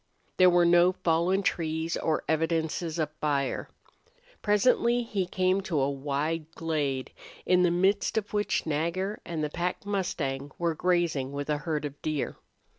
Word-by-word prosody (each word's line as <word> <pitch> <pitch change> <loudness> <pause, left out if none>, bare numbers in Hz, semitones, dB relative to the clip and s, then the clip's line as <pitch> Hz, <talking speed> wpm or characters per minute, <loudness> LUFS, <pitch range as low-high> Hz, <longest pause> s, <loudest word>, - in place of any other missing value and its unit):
There 185 0 +7
were 175 -1 +4
no 175 +1 +5
fallen 180 +3 +1
trees 160 -2 -1
or 160 -1 0
evidences 160 +1 0
of 155 -2 -1
fire. 140 -3 -1 0.7
Presently 235 +3 +3
he 200 -5 -2
came 185 +1 +1
to 170 -6 -1
a 135 +1 +1
wide 150 +3 -2
glade 145 -5 -2 0.3
in 180 0 +4
the 180 - +4
midst 190 +5 +1
of 215 -1 -2
which 205 0 0
Nagger 170 +6 -1
and 165 -3 -3
the 150 - -2
pack 175 +3 -3
mustang 145 -9 -2
were 170 -1 0
grazing 165 -6 0
with 145 +1 -3
a 150 - +1
herd 150 -2 -2
of 145 0 -7
deer. 155 -3 -2
165 Hz, 155 wpm, -28 LUFS, 150-185 Hz, 0.7 s, There